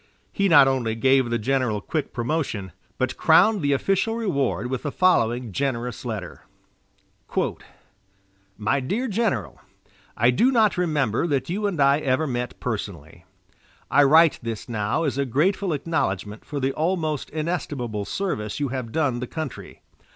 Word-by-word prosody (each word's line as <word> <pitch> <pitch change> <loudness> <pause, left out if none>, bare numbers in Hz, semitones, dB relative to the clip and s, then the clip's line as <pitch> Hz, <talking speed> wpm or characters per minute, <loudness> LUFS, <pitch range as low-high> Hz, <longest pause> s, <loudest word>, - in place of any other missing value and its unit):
He 200 -1 +1
not 145 -5 +7
only 125 -4 0
gave 130 +1 +3
the 120 - +1
general 125 -2 0
quick 150 +9 -3
promotion, 120 - -2 0.3
but 130 -1 -1
crowned 190 +6 +5
the 145 -1 +1
official 195 +9 0
reward 170 - -1
with 125 0 -3
the 145 - -3
following 120 - +2
generous 125 +1 -2
letter: 100 -8 -6 2.1
"My 105 +6 +1
Dear 205 - -2
General: 205 - -1 0.6
I 120 +2 +4
do 235 - +3
not 220 -5 +3
remember 150 -7 0
that 145 +1 -1
you 205 +3 -1
and 185 -6 -3
I 140 +1 +4
ever 135 +1 +1
met 125 -3 -4
personally. 90 -8 -6 0.7
I 145 - +6
write 160 +3 +5
this 115 -2 -5
now 105 +5 -1
as 140 -3 -1
a 140 - +1
grateful 180 - +1
acknowledgment 105 - -2
for 145 - -4
the 135 0 0
almost 160 -3 -1
inestimable 145 - -3
service 110 - -3
you 145 -2 -1
have 125 -3 -4
done 140 -5 0
the 125 - -4
country. 155 -2 -7
135 Hz, 150 wpm, -24 LUFS, 120-165 Hz, 2.1 s, not